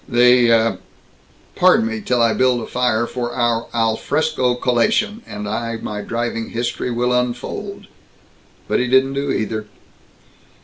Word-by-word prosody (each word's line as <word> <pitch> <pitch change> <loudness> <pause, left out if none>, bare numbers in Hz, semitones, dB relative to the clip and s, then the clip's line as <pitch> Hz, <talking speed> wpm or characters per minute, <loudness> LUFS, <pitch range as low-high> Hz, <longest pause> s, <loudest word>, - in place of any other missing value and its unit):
"The 120 -4 +4 0.8
Pardon - - +4
me 110 -1 -3
till 125 0 +1
I 115 -1 +3
build 125 -1 +2
a 115 - -5
fire 120 -2 0
for 120 0 -4
our 120 -2 0
al 115 -1 +1
fresco 145 -5 0
collation, 125 - +1
and 105 0 -6
I 115 +2 -3
my 105 -2 -5
driving 115 +1 -3
history 120 +1 -3
will 125 +1 0
unfold." 125 -1 -3 0.8
But - - +1
he 125 - 0
didn't 130 +2 +3
do 140 +1 -2
either. 110 0 -3
120 Hz, 140 wpm, -19 LUFS, 115-125 Hz, 0.8 s, The